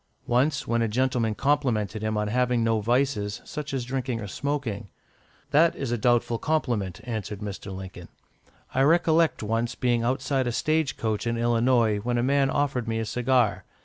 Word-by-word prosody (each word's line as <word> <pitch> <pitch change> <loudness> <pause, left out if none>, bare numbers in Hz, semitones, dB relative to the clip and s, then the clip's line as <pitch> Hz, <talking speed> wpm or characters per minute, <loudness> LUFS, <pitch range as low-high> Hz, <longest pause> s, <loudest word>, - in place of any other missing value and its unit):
Once, 135 +5 +1
when 115 0 +1
a 115 - +2
gentleman 120 -1 0
complimented 120 -7 0
him 110 0 -1
on 105 0 0
having 125 +1 +1
no 115 -1 +2
vices, 120 -3 0
such 150 -3 -6
as 130 -3 -2
drinking 130 -2 -2
or 105 - -5
smoking, 115 -3 -3 0.6
"That 165 +3 +4
is 135 -4 -4
a - - +2
doubtful 120 0 +2
compliment," 120 - -1
answered 110 -4 -4
Mr. 100 -1 -6
Lincoln. 95 -2 -8 0.7
"I 130 - +2
recollect 165 -1 +3
once 115 +3 -1
being 120 -2 +1
outside 130 +2 0
a - - 0
stage 155 +4 0
coach 110 0 -2
in 115 0 0
Illinois, 120 -2 +2
when 120 +3 -1
a 120 - +1
man 135 +1 +2
offered 135 -4 0
me 115 0 -1
a 115 - -1
cigar. 125 -2 +1
120 Hz, 175 wpm, -26 LUFS, 110-135 Hz, 0.7 s, That